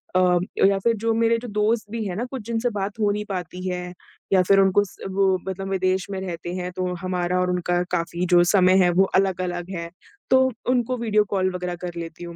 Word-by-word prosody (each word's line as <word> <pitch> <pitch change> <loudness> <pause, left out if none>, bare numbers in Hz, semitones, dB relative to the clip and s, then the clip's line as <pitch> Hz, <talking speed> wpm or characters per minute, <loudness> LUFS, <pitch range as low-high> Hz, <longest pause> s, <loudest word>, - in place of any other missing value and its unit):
अ, 180 -1 +4 0.3
या 195 0 +4
फिर 230 +4 +2
जो 230 0 +2
मेरे 230 0 +2
जो 245 - -7
दोस्त 215 +2 +1
भी 230 -1 -3
है 180 - -3
ना 230 +5 -2
कुछ 265 - -5
जिनसे 235 +1 0
बात 200 +1 -4
हो 210 - +2
नहीं 210 +1 -2
पाती 180 -1 -5
है 180 -1 -4 0.4
या 190 - +6
फिर 195 0 +5
उनको 195 +1 +4
उस 200 - -7
वो 190 0 +2
मतलब 195 0 -4
विदेश 185 -1 0
में 195 - -3
रहते 175 -2 -5
हैं 180 0 -4
तो 180 0 -3
हमारा 180 -1 -1
और 180 0 +1
उनका 175 0 0
काफ़ी 170 0 -1
जो 175 0 +7
समय 185 -2 +5
है 175 - +4
वो - - +7
अलग-अलग 180 -2 0
है 170 -1 -5 0.4
तो 260 0 +6 0.3
उनको 250 0 +1
वीडियो 215 -3 +2
कॉल 185 -2 +1
वग़ैरह 180 -1 -3
कर 175 -1 -5
लेती 165 0 -7
हूँ 170 -1 -8
185 Hz, 225 wpm, -23 LUFS, 180-210 Hz, 0.4 s, जो